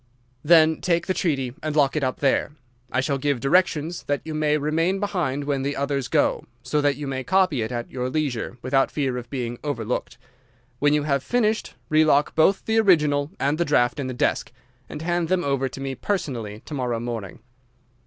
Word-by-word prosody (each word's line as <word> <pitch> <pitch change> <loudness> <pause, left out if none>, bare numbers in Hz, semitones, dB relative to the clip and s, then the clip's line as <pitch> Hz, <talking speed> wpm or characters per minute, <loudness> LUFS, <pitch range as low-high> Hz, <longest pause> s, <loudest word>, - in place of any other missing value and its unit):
"'Then 160 0 +5
take 170 -2 +1
the 185 - 0
treaty 140 -10 -1
and 155 -1 -3
lock 145 -2 +3
it 155 - 0
up 130 -1 -2
there. 140 +1 +1 0.4
I 130 - +1
shall 135 +1 -1
give 140 -2 0
directions 165 +3 +1
that 145 0 0
you 160 - -5
may 150 -1 +1
remain 165 +6 0
behind 170 -9 -1
when 140 -1 -1
the 140 +1 -2
others 140 -2 -1
go, - - +1 0.2
so 150 - 0
that 145 -1 +2
you 145 +2 -6
may 130 -1 -3
copy 185 -6 +2
it 110 - -3
at 120 -1 -4
your 125 0 -2
leisure 130 -5 -2
without 135 +1 +2
fear 135 -4 -1
of 120 -1 -7
being 120 -3 -4
overlooked. 125 -5 -3 0.6
When 145 +1 +3
you 150 - +1
have 140 -2 +1
finished, 225 - 0
relock 155 -2 +3
both 190 +5 +3
the 225 0 +2
original 150 -8 +3
and 145 +4 0
the 170 - +2
draft 120 -3 +2
in 135 - -2
the 130 - -4
desk, - - 0 0.4
and 150 - -7
hand 175 0 0
them 185 0 +1
over 135 -1 0
to 130 - -9
me 135 0 -3
personally 120 - -3
to - - -8
morrow 125 -4 -1
morning. 115 -5 -5
145 Hz, 200 wpm, -24 LUFS, 130-160 Hz, 0.6 s, Then